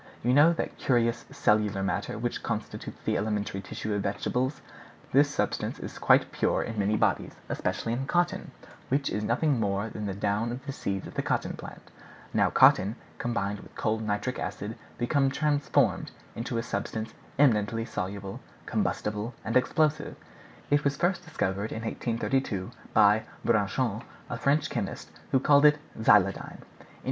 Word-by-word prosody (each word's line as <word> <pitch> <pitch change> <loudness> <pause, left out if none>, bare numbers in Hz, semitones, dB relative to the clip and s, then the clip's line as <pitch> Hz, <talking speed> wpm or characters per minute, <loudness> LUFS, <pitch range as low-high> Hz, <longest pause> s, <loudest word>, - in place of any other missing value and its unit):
You 125 +2 +3
know 145 +5 +7
that - - -4
curious 115 -2 +1
cellular 105 -2 +2
matter 95 - -2
which - - -2
constitutes - - -4
the - - +1
elementary 105 -2 -2
tissues 105 +2 -4
of - - -1
vegetable? 125 +6 0 0.6
This 145 +2 +5
substance 145 - -1
is - - -6
found - - -12
quite - - +5
pure - - +1
in 110 -2 -4
many 105 +2 +2
bodies, - - +1
especially 115 - -1
in 135 +3 -2
cotton, 175 +2 +1 0.4
which 140 +1 +1
is 105 - -1
nothing 125 +4 +1
more 100 +1 0
than 105 -1 -5
the 95 - -3
down 105 +3 0
of 130 +3 -6
the 140 - -3
seeds 100 -7 -3
of - - -9
the - - -1
cotton - - -1
plant. - - -10 0.4
Now - - +3
cotton, 100 +4 +5 0.2
combined 105 -4 -1
with - - -14
cold 110 0 0
nitric 105 +4 -2
acid, 100 +3 -4 0.2
become 135 +3 +2
transformed 145 0 +1 0.2
into 115 +1 -3
a 115 - -1
substance 110 -1 -3 0.2
eminently 115 -5 +3
insoluble, 100 -2 -5 0.3
combustible, 105 +3 -2
and 115 - -2
explosive. 150 +4 +2 0.6
It 145 0 +4
was 140 -1 +1
first 175 +2 +1
discovered 100 - -2
in 110 - -4
1832, 115 -3 -1 0.2
by 105 +2 +5 0.2
Braconnot, 110 +1 +1 0.3
a 115 - -2
French 140 +5 +2
chemist, - - -4 0.2
who 130 - +4
called 145 +2 +5
it 150 0 +7 0.2
xyloidine. 100 -3 +3
115 Hz, 155 wpm, -28 LUFS, 105-135 Hz, 0.6 s, know